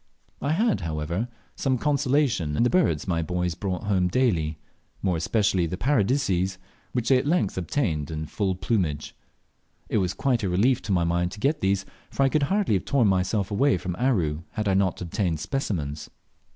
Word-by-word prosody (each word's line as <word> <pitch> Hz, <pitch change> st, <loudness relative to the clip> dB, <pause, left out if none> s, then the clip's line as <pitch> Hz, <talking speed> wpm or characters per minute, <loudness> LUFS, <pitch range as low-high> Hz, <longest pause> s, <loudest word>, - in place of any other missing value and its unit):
I 145 Hz, +2 st, +1 dB
had, 220 Hz, +4 st, +1 dB
however, 85 Hz, +6 st, -2 dB, 0.3 s
some 130 Hz, -2 st, 0 dB
consolation 135 Hz, -, +1 dB
in -, -, +3 dB
the 120 Hz, -, +2 dB
birds 90 Hz, -, +2 dB
my 85 Hz, -2 st, +1 dB
boys 90 Hz, +1 st, -1 dB
brought 90 Hz, 0 st, -3 dB
home 95 Hz, -3 st, +2 dB
daily, 85 Hz, -9 st, +1 dB, 0.5 s
more 95 Hz, -3 st, +1 dB
especially 95 Hz, +1 st, +1 dB
the 90 Hz, -, -4 dB
Paradiseas, 100 Hz, -6 st, +1 dB, 0.3 s
which 120 Hz, -2 st, -1 dB
they 130 Hz, -2 st, +6 dB
at 135 Hz, -, -3 dB
length 155 Hz, -, +1 dB
obtained 85 Hz, -, -1 dB
in 80 Hz, -1 st, -4 dB
full 95 Hz, +3 st, -1 dB
plumage. 90 Hz, -6 st, -1 dB, 0.7 s
It -, -, +2 dB
was 90 Hz, -2 st, -1 dB
quite 130 Hz, -4 st, +1 dB
a 100 Hz, -, -1 dB
relief 110 Hz, +8 st, +2 dB
to -, -, -1 dB
my 90 Hz, -3 st, +3 dB
mind 85 Hz, +1 st, 0 dB
to 105 Hz, -, -9 dB
get 140 Hz, +7 st, +1 dB
these, 100 Hz, 0 st, +1 dB, 0.2 s
for 140 Hz, -, 0 dB
I 135 Hz, -, +4 dB
could 155 Hz, +2 st, +1 dB
hardly 200 Hz, -, +2 dB
have 95 Hz, -, 0 dB
torn 125 Hz, -7 st, +3 dB
myself 95 Hz, +2 st, 0 dB
away 135 Hz, +7 st, +3 dB
from 90 Hz, -2 st, -4 dB
Aru 90 Hz, -, +1 dB
had 110 Hz, -1 st, -2 dB
I 95 Hz, -, +3 dB
not 95 Hz, -1 st, +1 dB
obtained 85 Hz, -2 st, -1 dB
specimens. 80 Hz, -, -3 dB
95 Hz, 185 wpm, -25 LUFS, 85-130 Hz, 0.7 s, they